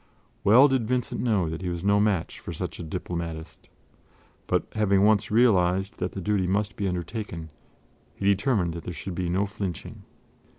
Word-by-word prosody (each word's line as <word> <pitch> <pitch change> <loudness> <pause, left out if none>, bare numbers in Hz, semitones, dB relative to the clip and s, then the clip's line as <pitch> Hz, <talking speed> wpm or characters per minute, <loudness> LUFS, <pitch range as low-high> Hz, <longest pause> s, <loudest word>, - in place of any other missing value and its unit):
Well 125 +8 +7
did 130 -5 0
Vincent 125 0 -1
know 105 -8 +1
that 80 +2 -5
he 90 - -2
was 85 0 -4
no 100 +1 +4
match 105 -5 0
for - - -7
such - - -5
a - - -5
diplomatist; 85 -1 -6 0.8
but - - +1
having 100 -2 +3
once 105 -1 +3
realized 95 -4 +3
that - - -2
the 95 - -5
duty 100 -1 +1
must 100 +2 0
be 100 - -1
undertaken, 90 -2 -4 0.6
he 95 - -5
determined 100 -3 +2
that 85 - -7
there 90 - -5
should 95 +4 -5
be 90 0 -2
no 95 +4 +1
flinching. 100 -4 -6
95 Hz, 175 wpm, -26 LUFS, 90-105 Hz, 0.8 s, Well